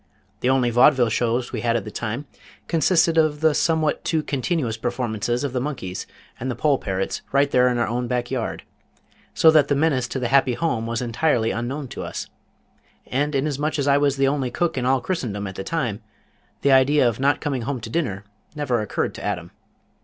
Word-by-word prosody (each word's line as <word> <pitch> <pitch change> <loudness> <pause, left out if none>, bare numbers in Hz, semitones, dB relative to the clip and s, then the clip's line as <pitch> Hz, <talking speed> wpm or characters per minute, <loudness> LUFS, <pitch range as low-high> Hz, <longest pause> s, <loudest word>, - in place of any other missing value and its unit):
The 125 - 0
only 130 -2 +2
Vaudeville 120 0 +5
shows 120 +2 0
we 115 - -3
had 115 0 +1
at 115 - 0
the 105 - -7
time 120 +7 -4 0.4
consisted 165 0 +3
of 155 -1 +1
the 160 -1 +4
somewhat 160 0 +1
too 160 -2 0
continuous 140 -3 -1
performances 120 0 -2
of 140 -3 -2
the 125 - -1
monkeys 120 -10 -5 0.3
and 130 - -3
the 125 - -2
poll 140 +2 +2
parrots 95 -1 -3
right 140 +1 +2
there 125 0 +4
in 125 -1 +1
our 120 - +2
own 120 +2 -2
back 125 0 -2
yard, 125 -4 -3 0.7
so 160 - +6
that 155 -3 +5
that 145 - +1
menace 140 -4 +1
to 130 - -4
the 125 -2 -1
happy 135 -2 +3
home 120 -9 -1
was 115 +1 -2
entirely 120 -1 +1
unknown 130 +5 -3
to - - -6
us, - - -5 0.8
and 145 +3 -1
inasmuch 150 +2 -1
as 140 -1 -1
I 140 0 +4
was 140 -1 +1
the 135 0 +3
only 135 -2 0
cook 170 +7 -1
in 125 -1 -1
all 130 0 +2
Christendom 120 - -3
at 95 - -5
the 95 - -6
time, 120 -5 -2 0.6
the 140 - +4
idea 135 0 +5
of 115 0 -1
not 140 +2 +2
coming 140 -5 -2
home 130 +2 -3
to 110 - -7
dinner 110 - -2 0.3
never 130 -6 0
occurred 105 - -2
to - - -9
Adam. - - -3
130 Hz, 205 wpm, -23 LUFS, 120-145 Hz, 0.8 s, so